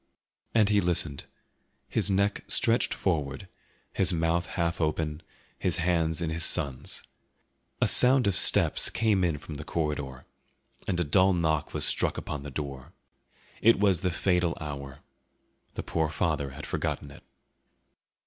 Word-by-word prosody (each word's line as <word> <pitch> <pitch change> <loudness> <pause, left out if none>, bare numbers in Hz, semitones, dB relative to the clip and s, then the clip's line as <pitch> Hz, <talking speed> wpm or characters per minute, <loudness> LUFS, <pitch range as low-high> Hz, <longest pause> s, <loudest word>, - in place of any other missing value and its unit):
And 105 -2 +4
he 105 -1 +3
listened, 85 -5 -1 0.6
his - - 0
neck 100 +1 0
stretched 115 0 +2
forward, 75 -2 -2 0.5
his 95 -1 +2
mouth 85 +1 0
half 85 -1 -2
open, 80 0 -1 0.4
his 90 -1 0
hands 85 -1 0
in 80 -2 -2
his 85 +1 -2
son's. 70 -6 0 0.8
A - - +3
sound 130 +1 +5
of 100 -2 +2
steps - - +4
came 105 -4 +1
in 85 -4 0
from 75 0 -9
the 75 - -7
corridor, 75 -5 -3 0.6
and 90 - -1
a - - +2
dull 95 +5 +3
knock 80 -4 -1
was - - +1
struck - - +1
upon 75 - -5
the 70 - -7
door. 70 -2 -7 0.7
It 115 -1 +5
was 95 -4 +3
the 90 - 0
fatal 90 -1 0
hour. 70 -3 -7 0.7
The - - -4
poor 80 -2 -1
father 70 -2 -1
had 70 +3 -9
forgotten 70 - -3
it. 70 - -14
85 Hz, 150 wpm, -28 LUFS, 75-95 Hz, 0.8 s, sound